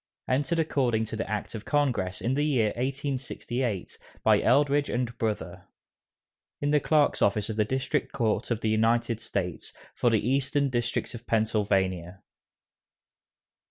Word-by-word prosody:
Entered 145 +6 +1
according 130 -8 +1
to 110 -1 -4
Act 105 0 -3
of 110 -2 -6
Congress, 125 -11 0
in 125 - 0
the 145 +2 +1
year 130 -8 +2
1868, 130 -4 -3 0.2
by - - +5
ELDREDGE 140 -4 +2
& - - -40
BROTHER, 90 -4 -3 0.9
in 145 0 0
the 150 - +5
Clerk's 150 0 +2
Office 105 +1 +2
of - - -5
the 105 -1 +2
District 130 +3 -1
Court 115 -5 0
of 115 -2 -1
the 110 - 0
United 115 +1 +2
States 90 -4 -4 0.2
for 120 - +2
the 110 -1 +1
Eastern 140 +1 +1
District 120 0 -1
of 120 0 -10
Pennsylvania. 95 -5 0
115 Hz, 140 wpm, -27 LUFS, 105-135 Hz, 0.9 s, by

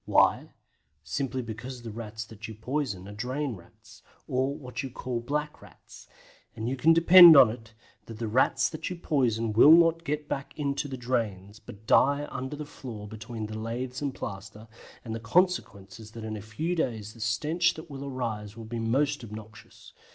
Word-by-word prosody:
Why? - - +3 0.5
Simply 130 - -3
because 120 +3 -7
the 115 - -6
Rats 110 0 -7
that 110 0 -10
you 110 - -8
poison 110 -5 -3
are - - -8
Drain 130 +4 -3
Rats, 85 -3 -17 0.3
or 130 +2 0
what 130 -4 -6
you 135 - -5
call 125 -1 -4
Black 150 +5 -3
Rats, - - -16 0.5
and 110 +1 -4
you 130 - -1
can 155 +5 +4
depend 170 0 +9
upon 130 -6 +8
it 115 -1 -11 0.3
that 115 - -9
the 115 0 -3
Rats 120 +5 +2
that 155 - -5
you 180 - -4
poison 120 -10 0
will 120 +8 +8
not 165 0 +5
get 150 -1 -3
back 135 -1 -5
into 145 -1 -2
the 135 -2 -6
drains, 110 -5 -3
but 105 +1 -13
die 140 +5 +3
under 130 +3 -5
the 150 0 -6
floor 115 -7 -9
between 110 +1 -7
the 110 +1 -7
laths 125 +4 -4
and 140 -3 -3
plaster, 105 +3 -8 0.4
and 110 - -5
the 115 - -4
consequence 115 - 0
is 110 -1 -11
that 115 - -8
in 110 0 -4
a 105 - -6
few 155 - -3
days 110 -9 -2
the 115 - -16
stench 150 +10 +1
that 160 +2 -10
will 140 -2 -8
arise 115 -6 -5
will 115 - -8
be 115 +1 -5
most 135 +5 0
obnoxious. 110 0 -12
120 Hz, 190 wpm, -28 LUFS, 110-140 Hz, 0.5 s, depend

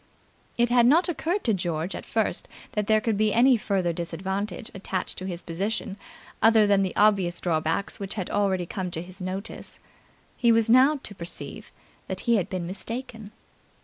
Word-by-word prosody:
It 240 0 +3
had 240 -1 +5
not 335 +7 +5
occurred 345 +4 -1
to 225 - +2
George 175 -2 -2
at - - -7
first - - -1 0.2
that 210 -1 -2
there 220 0 +4
could 215 -2 0
be 215 -1 +3
any 250 +4 +5
further 195 -6 0
disadvantage 190 +4 -4
attached 195 -1 -3
to 185 - -5
his 175 -2 -5
position 195 +4 -3 0.5
other 220 -1 +6
than 200 -1 +4
the 190 -2 -1
obvious 195 -4 +3
drawbacks 165 +2 -1
which 195 +1 -4
had 190 -5 -4
already 190 -3 +1
come 185 0 -4
to 165 -2 -4
his 185 +2 -12
notice. 190 +3 -5 0.6
He 235 -1 +3
was 225 0 +3
now 270 +4 +6
to 205 - -5
perceive 170 -3 -6 0.4
that - - -4
he 235 -2 +3
had 190 - -1
been 185 -2 -3
mistaken. 225 +3 -6
200 Hz, 180 wpm, -26 LUFS, 185-225 Hz, 0.6 s, other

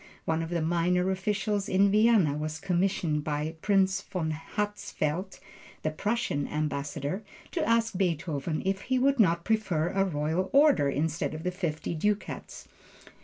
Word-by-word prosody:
One 160 0 0
of 165 - -4
the 170 -2 -1
minor 175 +3 +1
officials 200 +1 -1
in 195 +1 +4
Vienna 210 -7 +4
was 155 +1 -4
commissioned 175 -4 0
by 150 +1 -2
Prince 195 -2 +2
von 170 -5 -3
Hatzfeld, 190 0 -3 0.4
the 155 - 0
Prussian 200 -5 -1
Ambassador, 150 +3 -2 0.3
to - - -1
ask 230 -2 +2
Beethoven 165 -4 -1
if 195 0 0
he 260 - +3
would 275 +1 +2
not 170 -5 +3
prefer 195 -7 +1
a 195 +1 +1
royal 165 +1 -1
order 275 - +5
instead 155 +2 -1
of 155 - -7
the 180 - 0
fifty 170 -4 -3
ducats. 205 +6 -3
180 Hz, 145 wpm, -28 LUFS, 155-200 Hz, 0.4 s, order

